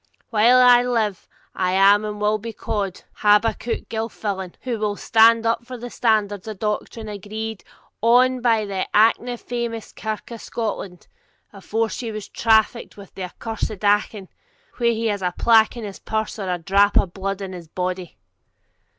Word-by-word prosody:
While 230 +3 +5
I 245 -1 +7
live 225 -6 -1 0.3
I 180 0 0
am 200 +2 +5
and 210 -1 -5
will 210 +1 +1
be 225 +2 -7
called 200 -5 -4
Habakkuk 210 +3 +1
Gilfillan, 205 -4 -4
who 240 -4 -3
will 210 -1 -1
stand 225 +2 +4
up 230 +1 +1
for 250 +1 -8
the 240 0 -8
standards 210 -3 0
of 215 -2 -6
doctrine 215 +2 -3
agreed 215 +1 -6 0.4
on 250 +3 +4
by 225 -3 +2
the 195 -2 -3
ance 230 +2 +2
famous 235 -2 -4
Kirk 220 +1 -5
of 230 - -8
Scotland, 200 -5 -5 0.5
before 220 +3 -2
she 230 0 -5
trafficked 220 +2 +1
with 200 -2 -13
the 190 - -5
accursed 215 +1 -5
Achan, 205 -1 +1 0.5
while 235 -1 +2
he 230 0 -1
has 205 -3 -1
a 180 -1 -2
plack 225 0 +4
in 235 - -6
his 200 -2 -7
purse 220 0 -3
or 195 -2 -3
a 180 - 0
drap 200 +4 +3
o' - - +4
bluid 195 +2 -4
in 190 -1 -6
his 175 -2 -9
body.' 180 - -4
215 Hz, 165 wpm, -22 LUFS, 200-230 Hz, 0.5 s, I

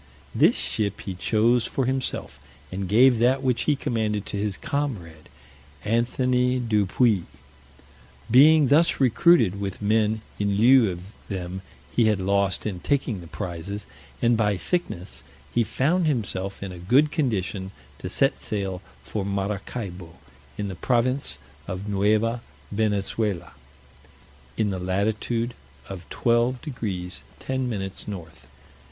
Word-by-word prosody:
This - - +4
ship 100 -2 -1
he 95 - -5
chose 115 +6 +2
for 135 - -1
himself, 130 - -3 0.3
and 95 0 -4
gave 120 +3 +5
that 130 +3 +3
which 125 -2 +1
he 150 - +3
commanded 110 -5 -1
to 105 - -4
his 100 -1 -2
comrade, 100 - -4 0.6
Anthony 125 +3 +1
du 105 -5 +1
Puis. 105 -3 +2 1.1
Being 150 +2 +7
thus 160 +4 +4
recruited 120 - +4
with 95 -2 -3
men 110 +1 +1 0.2
in 100 -1 +1
lieu 120 -1 +6
of 85 -1 -7 0.3
them 95 -1 -5 0.3
he 120 - +4
had 105 -3 +2
lost 100 0 +1
in 100 -4 -3
taking 130 -5 -1
the 85 - -11
prizes, 90 +5 -5 0.4
and 120 0 +4
by 105 -3 +1
sickness, 90 - -3 0.3
he 120 - +3
found 155 - +1
himself 100 -8 -2
in 95 - -5
a 90 - -9
good 130 - +3
condition 100 - -1 0.3
to - - -5
set - - +1
sail 95 -3 -3 0.2
for 95 +10 -3
Maracaibo, 100 -3 -4 0.4
in 105 - -2
the 95 - -4
province 125 +6 +1 0.3
of 95 +2 -5
Neuva 105 +4 +1 0.3
Venezuela, 100 -3 -1 1.1
in 105 -2 +1
the 95 - -3
latitude 110 +6 -1 0.3
of 95 -3 -9
12 120 +2 +1
deg. 100 - -4 0.3
10 130 -1 -2
min. 95 -4 -3 0.2
north. 85 -6 -8
105 Hz, 135 wpm, -25 LUFS, 95-125 Hz, 1.1 s, Being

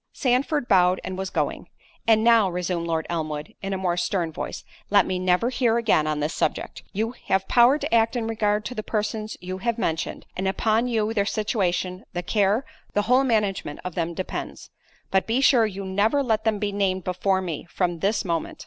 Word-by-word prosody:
Sandford 270 +2 +1
bowed 185 -2 +4
and 185 - -4
was 190 0 -3
going. - - -2 0.4
"And 220 -1 +5
now," 230 -4 +5
resumed 175 -1 -2
Lord 160 -1 -1
Elmwood, 155 -3 -4
in 195 - -4
a 190 - -1
more 180 -2 -1
stern 175 -2 -1
voice, - - -6 0.3
"let 205 0 +5
me 185 -1 -2
never 185 +6 +2
hear 235 -3 +2
again 210 -10 +2
on 150 -1 -1
this 150 +3 -1
subject. - - -2
You 220 +3 -1 0.2
have 190 0 +1
power 245 +4 +5
to 300 - -4
act 230 +1 +3
in 235 -2 -1
regard 215 -2 0
to - - -4
the 215 - -3
persons 215 0 -3
you 185 +1 -5
have 235 +3 -1
mentioned; 160 -7 -2
and 190 +1 -2
upon 220 +4 +1
you 220 -2 0
their 200 -2 +1
situation, 185 -4 -1
the 175 - -3
care, 210 +6 +1 0.3
the 205 - +2
whole 250 +5 +4
management 210 - 0
of 180 - -4
them 170 0 -2
depends—but 190 +1 -4
be 230 +3 +1
sure 250 -5 +5
you 195 -1 -6
never 205 +9 +2
let 220 -3 0
them 220 -2 +2
be 205 0 -2
named 190 -2 0
before 185 +2 0
me, 165 -2 -5
from 175 -2 -1
this 205 +4 0
moment." 165 -2 -2
200 Hz, 200 wpm, -24 LUFS, 180-225 Hz, 0.4 s, And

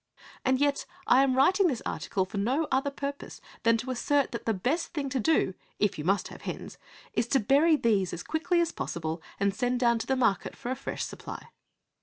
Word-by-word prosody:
And 260 0 +2
yet 285 0 +1 0.2
I 260 - +6
am 270 -2 +3
writing 365 +9 +4
this 260 -8 -2
article 190 -2 -1
for 195 +2 -5
no 265 +10 +1
other 270 +2 +2
purpose 280 0 -6 0.2
than 230 0 +4
to 250 +3 -4
assert 280 +3 +1
that 235 - -6
the - - +4
best 285 - -1
thing 280 -3 -1
to 265 0 -1
do, 305 -7 +2 0.2
if 205 -6 0
you - - -3
must 195 +5 +1
have - - -11
hens, - - -6 0.3
is 235 - 0
to 270 - +3
bury 285 +8 +4
these 205 - +1
as 175 - -5
quickly 320 +3 0
as 335 -1 0
possible 160 0 -4 0.2
and 200 0 +2
send 245 +3 0
down 235 -2 +3
to 225 - -5
the 265 - +2
market 230 -7 +1
for 250 -2 -5
a - - 0
fresh - - -4
supply. - - -8
255 Hz, 215 wpm, -28 LUFS, 215-285 Hz, 0.3 s, I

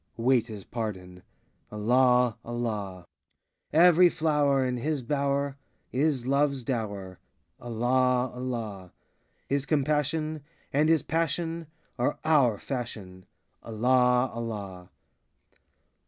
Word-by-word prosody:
Wait 120 0 +2
his 105 -4 -8
pardon,— 95 -6 -6 0.5
Allah, 125 +2 +3
Allah! 105 -6 -4 0.7
95 165 +3 +7
Every 175 +1 +6
flower 145 -5 +1
In 125 -1 -1
his 145 +2 -2
bower 140 +1 -1 0.3
Is 135 -2 0
Love's 140 0 +1
dower,— 100 -7 -4 0.4
Allah, 125 +2 +1
Allah! 115 -7 -5 0.5
His 140 0 -1
compassion 155 +1 0 0.3
And 150 +3 +3
his 160 -4 +3
passion 165 +1 -2 0.3
Are 125 - 0
our 140 -9 +4
fashion,— 105 -9 -6 0.3
Allah, 125 +2 +2
Allah! 100 -6 -6
125 Hz, 95 wpm, -27 LUFS, 110-145 Hz, 0.7 s, 95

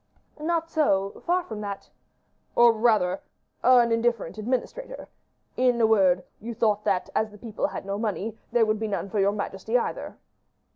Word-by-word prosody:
"Not 330 +1 -1
so; 200 -12 0
far 360 +1 +2
from 220 -8 -7
that." 200 -1 -6 0.6
"Or, 235 -1 +7
rather 215 -5 +2 0.4
an 245 -2 +5
indifferent 230 -4 0
administrator. 265 - -4 0.5
In 250 -2 +3
a 225 - +5
word, 190 -5 +4 0.2
you 230 +2 -6
thought 210 -2 +1
that, 195 -3 0
as 220 - +1
the 210 - -14
people 220 0 -3
had - - -7
no 200 +1 -3
money, 215 0 -2 0.2
there 235 -2 +4
would 215 0 0
be 220 - -2
none 200 -1 -3
for 210 - 0
your 200 +1 +3
majesty 205 +2 -2
either." 240 - -4
220 Hz, 165 wpm, -26 LUFS, 200-240 Hz, 0.6 s, Or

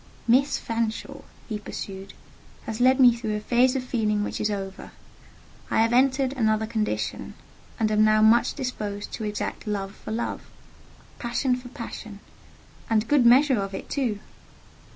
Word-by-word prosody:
"Miss 260 +4 +3
Fanshawe," 225 -1 -3 0.3
he 215 -2 -4
pursued, 195 -1 -8 0.5
"has 220 +1 -5
led 260 +2 +5
me 245 -3 +7
through 220 -3 -3
a - - -2
phase 245 +4 +2
of 260 - -1
feeling 215 -4 0
which - - -4
is 215 - +1
over: 195 -2 -6 0.8
I - - +1
have 230 +1 +1
entered 265 +1 +3
another 220 -4 +1
condition, 220 -1 -3 0.4
and 215 -1 +1
am 215 0 +4
now 215 0 +4
much 225 +2 +4
disposed 210 -5 -4
to 220 - -5
exact 210 +1 -4
love 200 -2 -3
for - - -11
love—passion 235 +2 -4
for 250 0 -10
passion—and 220 -2 -6
good 280 -5 +4
measure 260 0 +5
of 195 0 -4
it, - - -8
too." 245 -7 0
225 Hz, 150 wpm, -25 LUFS, 210-250 Hz, 0.8 s, me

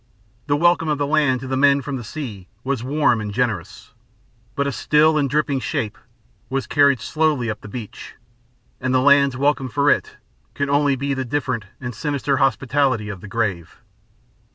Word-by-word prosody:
The 145 0 +2
welcome 175 0 +3
of 150 - +1
the 145 - 0
land 145 -4 +2
to 135 - -6
the 130 - -1
men 140 0 +4
from 140 +1 -4
the 125 - -5
sea 110 -7 -7 0.2
was 130 -3 -2
warm 135 -4 +2
and 105 -1 -4
generous, 110 -6 -3 0.6
but 140 - 0
a 140 - -1
still 150 +6 +3
and 145 -2 +1
dripping 145 -1 0
shape 110 -4 -3 0.5
was 135 +1 -2
carried 140 -3 +3
slowly 150 -2 0
up 105 - -8
the - - -10
beach, 110 0 -8 0.6
and 130 0 0
the - - +5
land's 140 0 +4
welcome 140 -1 +1
for 145 +3 +2
it - - -1 0.4
could 140 0 -1
only 140 -1 +3
be 140 +2 -2
the 135 -1 -2
different 130 -4 -2
and 120 -1 -5
sinister 140 +2 -1
hospitality 130 -3 +1
of 100 -4 -7
the - - -9
grave. 100 -6 -3
135 Hz, 180 wpm, -21 LUFS, 120-145 Hz, 0.6 s, the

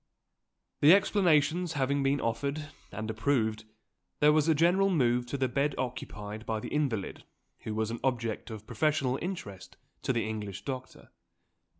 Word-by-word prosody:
The 155 +6 +8
explanations 175 -4 +2
having 140 0 +1
been 135 +1 +2
offered 140 +7 -2 0.2
and 110 +2 -5
approved, 110 -2 0 0.5
there 150 0 +6
was 155 0 +3
a 160 - +4
general 180 +5 +4
move 125 -8 +2
to 140 - -3
the 130 -1 +1
bed 140 +4 0
occupied 110 -4 -5
by 110 -1 -2
the - - -6
invalid 135 -10 -2 0.4
who 110 - -5
was 110 0 -1
an 115 - -4
object 115 -5 -1
of 110 -1 -8
professional 135 +2 0
interest 100 - -6 0.2
to - - 0
the 115 -3 0
English 105 -2 -5
doctor. 130 -2 -7
130 Hz, 155 wpm, -30 LUFS, 110-150 Hz, 0.5 s, The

